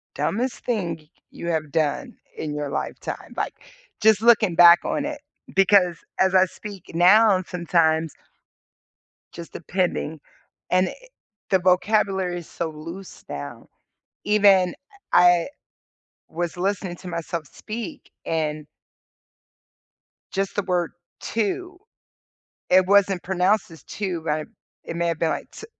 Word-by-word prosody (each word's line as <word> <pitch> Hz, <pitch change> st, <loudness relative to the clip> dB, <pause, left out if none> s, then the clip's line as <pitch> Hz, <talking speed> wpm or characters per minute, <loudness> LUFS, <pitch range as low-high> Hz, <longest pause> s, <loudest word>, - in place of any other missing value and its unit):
dumbest 200 Hz, -, -2 dB
thing 185 Hz, -9 st, -1 dB
y 155 Hz, -, -22 dB, 0.2 s
you 170 Hz, -, -7 dB
have 155 Hz, -3 st, -2 dB
done 155 Hz, -3 st, -1 dB, 0.2 s
in 150 Hz, -2 st, -4 dB
your 145 Hz, -1 st, -3 dB
lifetime." -, -, -5 dB
Like, -, -, -2 dB, 0.5 s
just 220 Hz, -1 st, +5 dB
looking 220 Hz, -6 st, +4 dB
back 170 Hz, 0 st, +9 dB
on 285 Hz, -, -1 dB
it, 295 Hz, -1 st, -5 dB, 0.3 s
because, 190 Hz, -3 st, +4 dB, 0.2 s
as 190 Hz, 0 st, +3 dB
I 185 Hz, 0 st, +6 dB
speak 195 Hz, 0 st, -10 dB
now 200 Hz, +4 st, +6 dB
and 185 Hz, -1 st, -2 dB
sometimes 165 Hz, -3 st, +1 dB, 1.2 s
just 170 Hz, -1 st, -10 dB
depending, 170 Hz, -3 st, -2 dB, 0.5 s
and, 185 Hz, +1 st, +3 dB
eh, -, -, -6 dB, 0.6 s
the 190 Hz, -, +4 dB
vocabulary 185 Hz, 0 st, +1 dB
is 170 Hz, -, -10 dB
so 165 Hz, -1 st, -4 dB
loose 165 Hz, +5 st, -10 dB
now. 70 Hz, 0 st, -7 dB, 0.6 s
Even, 200 Hz, -4 st, +4 dB, 0.4 s
eh, 175 Hz, -1 st, +6 dB
I -, -, -8 dB, 0.8 s
was 175 Hz, +1 st, -4 dB
listening 190 Hz, -1 st, -2 dB
to 180 Hz, -, -10 dB
myself 170 Hz, -2 st, -4 dB
speak 235 Hz, -, -8 dB, 0.2 s
and 155 Hz, -2 st, -2 dB, 1.7 s
just 195 Hz, +1 st, -2 dB
the 205 Hz, -, +1 dB
word, 175 Hz, -2 st, -1 dB, 0.3 s
"to," 360 Hz, -, -3 dB, 0.9 s
it 185 Hz, 0 st, +5 dB
wasn't 195 Hz, -2 st, +3 dB
pronounced 190 Hz, +1 st, +1 dB
as, 160 Hz, -3 st, -13 dB
"to," 185 Hz, -5 st, -4 dB
but 155 Hz, -1 st, -2 dB, 0.4 s
it 170 Hz, -, -6 dB
may 170 Hz, -, 0 dB
have 165 Hz, -2 st, -1 dB
been, 165 Hz, -, +1 dB
like, -, -, -4 dB
t 440 Hz, -, -10 dB
180 Hz, 135 wpm, -23 LUFS, 165-200 Hz, 1.7 s, back